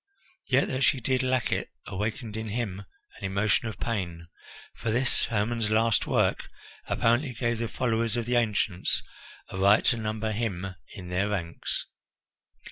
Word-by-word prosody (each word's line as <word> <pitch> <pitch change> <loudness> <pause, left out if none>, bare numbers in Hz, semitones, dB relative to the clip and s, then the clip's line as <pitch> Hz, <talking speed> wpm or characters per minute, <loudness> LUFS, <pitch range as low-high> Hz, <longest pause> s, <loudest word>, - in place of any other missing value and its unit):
Yet - - +3
that 130 +1 0
she 135 - +4
did 130 +1 +1
lack 130 -2 +1
it - - -1 0.2
awakened 105 +3 -3
in 110 0 -3
him 100 -3 -3 0.3
an - - -14
emotion 100 +3 +1
of 110 - -6
pain, 85 -7 -3 0.5
for 115 - -3
this, 125 +4 +3
Hermon's 115 0 0
last 110 0 +3
work, - - +2 0.5
apparently 120 +3 +2
gave 120 -1 -1
the 115 - -1
followers 115 -1 0
of 120 - -1
the 120 +1 0
ancients 105 -5 +1 0.5
a 95 - -5
right 100 +3 +5
to 120 - +4
number 110 0 -2
him 95 -4 -2 0.2
in 90 -4 -8
their 95 +3 +1
ranks. 85 -5 -2
110 Hz, 155 wpm, -28 LUFS, 100-120 Hz, 0.5 s, right